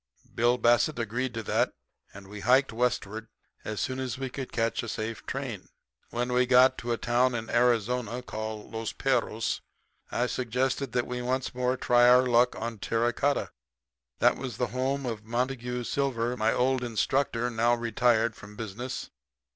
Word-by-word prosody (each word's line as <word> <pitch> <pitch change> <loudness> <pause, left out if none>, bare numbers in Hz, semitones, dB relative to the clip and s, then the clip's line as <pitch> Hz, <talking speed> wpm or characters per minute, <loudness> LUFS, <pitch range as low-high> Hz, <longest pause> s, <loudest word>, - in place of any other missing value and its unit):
"Bill 120 +2 +3
Bassett 120 +5 +3
agreed 120 +3 -2
to 115 - -3
that, - - +1 0.4
and 100 0 -12
we 105 +1 -8
hiked 130 +3 +3
westward 110 -2 -1 0.4
as 110 -1 -4
soon 130 0 -2
as 130 -2 -3
we 135 -1 -4
could 135 -1 -6
catch 115 -1 0
a 115 - -6
safe 110 +1 -4
train. 130 -8 -5 0.4
"When 120 +1 -2
we 125 0 +3
got 130 +1 +6
to 120 - -3
a 115 - +1
town 120 +2 +2
in 115 -1 -4
Arizona 120 0 +1
called 110 -2 -6
Los 110 -1 -4
Perros - - 0 0.5
I 120 - 0
suggested 130 +1 -1
that 125 -1 +1
we 125 0 -4
once 130 +1 -1
more 125 +1 0
try 120 -1 +5
our 125 +1 +6
luck 125 0 +3
on 115 -1 -5
terra 115 +4 0
cotta. 145 +4 0 0.7
That - - +4
was 125 -5 -5
the 125 - -1
home 135 +2 -1
of 115 -3 -4
Montague 125 +1 -2
Silver, 125 -2 -1
my 110 -1 +2
old 130 0 +1
instructor, 120 +1 0
now 120 +1 +3
retired 115 -1 +2
from 105 +1 -12
business. 115 +4 -5
120 Hz, 170 wpm, -28 LUFS, 115-125 Hz, 0.7 s, got